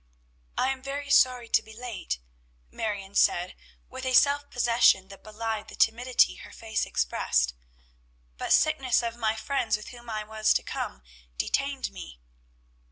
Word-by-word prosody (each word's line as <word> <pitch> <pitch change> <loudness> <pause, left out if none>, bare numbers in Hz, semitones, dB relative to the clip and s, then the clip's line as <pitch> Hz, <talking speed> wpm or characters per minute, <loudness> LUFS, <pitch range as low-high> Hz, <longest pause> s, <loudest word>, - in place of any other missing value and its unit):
"I 260 - +2
am 265 -1 -3
very 280 +1 -5
sorry 250 -3 +4
to - - +4
be 220 - -14
late," 230 - -4 0.5
Marion 200 -3 -4
said 180 -2 +2 0.3
with 260 0 -8
a 260 -1 +1
self 285 +2 +4
possession 230 -6 +3
that 195 - -13
belied 220 0 -4
the - - -11
timidity 235 - +3
her - - -11
face - - -3
expressed; 60 0 0 0.8
"but - - -4
sickness 270 -6 +3
of 230 0 -3
my 220 -2 0
friends 225 -1 0
with 210 - -10
whom 240 -1 -12
I 215 -1 -3
was 215 0 +1
to - - +1
come, 65 0 -5 0.3
detained 275 - -1
me." - - -10
230 Hz, 155 wpm, -27 LUFS, 210-260 Hz, 0.8 s, sorry